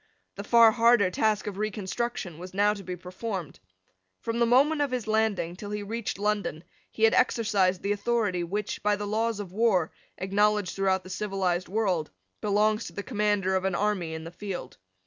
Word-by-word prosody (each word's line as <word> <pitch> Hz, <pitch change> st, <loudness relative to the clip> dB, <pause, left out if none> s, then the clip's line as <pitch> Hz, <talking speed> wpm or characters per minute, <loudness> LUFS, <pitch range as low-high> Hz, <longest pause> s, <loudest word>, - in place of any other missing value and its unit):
The 200 Hz, -, -7 dB
far 230 Hz, +1 st, +6 dB
harder 230 Hz, -4 st, +4 dB
task 215 Hz, +2 st, +1 dB
of 200 Hz, -1 st, -5 dB
reconstruction 210 Hz, -3 st, -3 dB
was 185 Hz, +1 st, -9 dB
now 205 Hz, +1 st, +3 dB
to 205 Hz, -, -8 dB
be 185 Hz, -1 st, -5 dB
performed. 185 Hz, -, -6 dB, 0.6 s
From 230 Hz, 0 st, -3 dB
the 235 Hz, -, +4 dB
moment 285 Hz, +6 st, +4 dB
of 285 Hz, -, +1 dB
his 250 Hz, -3 st, -2 dB
landing 215 Hz, -6 st, 0 dB
till 205 Hz, +2 st, -8 dB
he 210 Hz, 0 st, -3 dB
reached 225 Hz, 0 st, -4 dB
London 205 Hz, -6 st, -1 dB, 0.3 s
he 220 Hz, -, -5 dB
had 225 Hz, -, +6 dB
exercised 205 Hz, -7 st, +2 dB
the 200 Hz, -, 0 dB
authority 205 Hz, -3 st, 0 dB
which, 200 Hz, +4 st, -3 dB
by 210 Hz, 0 st, +2 dB
the 205 Hz, +1 st, -4 dB
laws 220 Hz, +1 st, -1 dB
of 195 Hz, -4 st, -6 dB
war, 195 Hz, -5 st, +2 dB, 0.3 s
acknowledged 205 Hz, 0 st, +1 dB
throughout 190 Hz, -1 st, +1 dB
the 185 Hz, -, -10 dB
civilised 190 Hz, -4 st, -1 dB
world, 190 Hz, -6 st, 0 dB, 0.3 s
belongs 210 Hz, +2 st, +2 dB
to -, -, -8 dB
the 205 Hz, -, -5 dB
commander 205 Hz, -5 st, 0 dB
of 185 Hz, -, 0 dB
an 190 Hz, -2 st, 0 dB
army 190 Hz, -6 st, -1 dB
in 160 Hz, -, -6 dB
the 165 Hz, -, -8 dB
field. 185 Hz, -7 st, -6 dB
205 Hz, 185 wpm, -27 LUFS, 185-220 Hz, 0.6 s, far